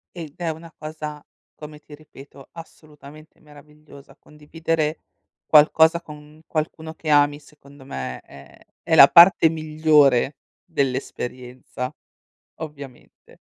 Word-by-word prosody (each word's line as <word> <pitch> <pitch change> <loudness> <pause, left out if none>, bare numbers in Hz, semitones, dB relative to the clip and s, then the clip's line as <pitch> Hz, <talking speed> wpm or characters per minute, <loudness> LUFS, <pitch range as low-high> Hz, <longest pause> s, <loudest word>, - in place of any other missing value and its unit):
Ed 160 -4 -9
è 170 -2 -3
una 160 +1 -9
cosa, 155 -1 -8 0.3
come 150 0 -12
ti 150 - -17
ripeto, 140 -2 -17
assolutamente 155 -2 -15
meravigliosa, 150 -1 -18
condividere 155 +1 -4 0.5
qualcosa 160 +2 +4
con 150 -1 -15
qualcuno 160 0 -5
che 155 -1 -8
ami, 145 0 +3
secondo 140 -2 -19
me, 65 - -7
è 70 -1 -17 0.3
è 160 - +2
la 140 - +9
parte 170 -1 +7
migliore 155 -4 +2 0.3
dell'esperienza, 125 -1 -5 0.7
ovviamente. 140 -5 -12
150 Hz, 105 wpm, -21 LUFS, 140-155 Hz, 0.7 s, la